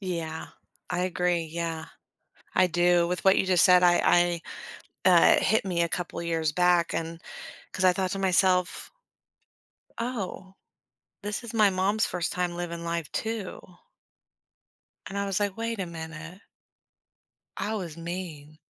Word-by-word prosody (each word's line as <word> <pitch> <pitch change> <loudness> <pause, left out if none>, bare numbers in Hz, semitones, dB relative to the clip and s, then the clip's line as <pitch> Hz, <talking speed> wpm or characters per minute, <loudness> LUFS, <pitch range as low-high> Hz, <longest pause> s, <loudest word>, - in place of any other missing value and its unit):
Yeah. 165 -4 -4 0.4
I 180 - -1
agree, 180 -2 0
yeah. 165 -1 -3 0.7
I 185 - +5
do. 175 0 +3
With 180 0 -3
what 190 - +6
you - - +2
just 185 -2 +5
said, 180 0 +6
I 175 -1 +4 0.7
I - - +8
uh, - - +6
hit 220 -2 +2
me 175 -3 0
a 170 - +1
couple 170 -1 -4
years 165 -2 -1
back 175 0 +3
and 165 0 -4 0.5
'cause 185 - -2
I 185 - +6
thought 185 0 -1
to 195 - -3
myself, 185 -1 +2 1.1
"Oh, 195 -5 -5 0.7
this 205 +3 -3
is 235 - -6
my 215 -3 +5
mom's 195 +4 +1
1st 175 -2 -2
time 180 -1 -2
living 170 -1 -5
life 170 -2 -3
too." 220 -4 -4 1.5
And 200 - -5
I 200 - -1
was 195 0 -1
like, 205 -2 -1
"Wait 230 -1 -3
a 185 - -2
minute" 165 +2 -8 1.2
"I 220 - -2
was 175 -7 -5
mean." 165 -3 -7
180 Hz, 150 wpm, -27 LUFS, 170-190 Hz, 1.5 s, I